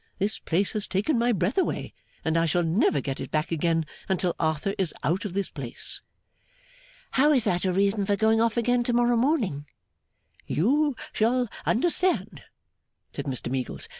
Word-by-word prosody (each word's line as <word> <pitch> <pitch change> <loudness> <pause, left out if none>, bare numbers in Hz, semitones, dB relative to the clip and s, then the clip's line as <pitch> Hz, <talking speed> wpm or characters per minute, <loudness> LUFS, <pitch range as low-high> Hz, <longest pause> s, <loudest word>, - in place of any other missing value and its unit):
This 205 +2 -1
place 185 +4 0
has 210 -1 -1
taken 220 +8 +1
my 240 +1 +3
breath 195 - +1
away, 375 - -2 0.3
and 160 - +1
I 165 0 +3
shall 175 +3 +1
never 165 -4 +2
get 135 +1 -4
it - - -5
back 155 +2 -1
again 165 0 +1 0.2
until 180 -2 0
Arthur 160 +4 0
is 185 -5 -1
out 180 +7 0
of 195 - -4
this 200 -2 -1
place.' 135 -5 -5 1.1
'How 290 +3 +4
is 255 -5 +4
that 180 -1 0
a 185 - +2
reason 200 +2 +1
for 205 - +3
going 220 +2 +3
off 230 0 +1
again 245 +1 +2
to 245 - +1
morrow 240 0 +3
morning?' 230 - 0 0.8
'You 280 - +2 0.2
shall 240 +2 +1 0.2
understand,' 235 - +1 0.7
said 140 - -5
Mr 130 -3 -3
Meagles. 130 -1 -4
200 Hz, 170 wpm, -26 LUFS, 165-235 Hz, 1.1 s, How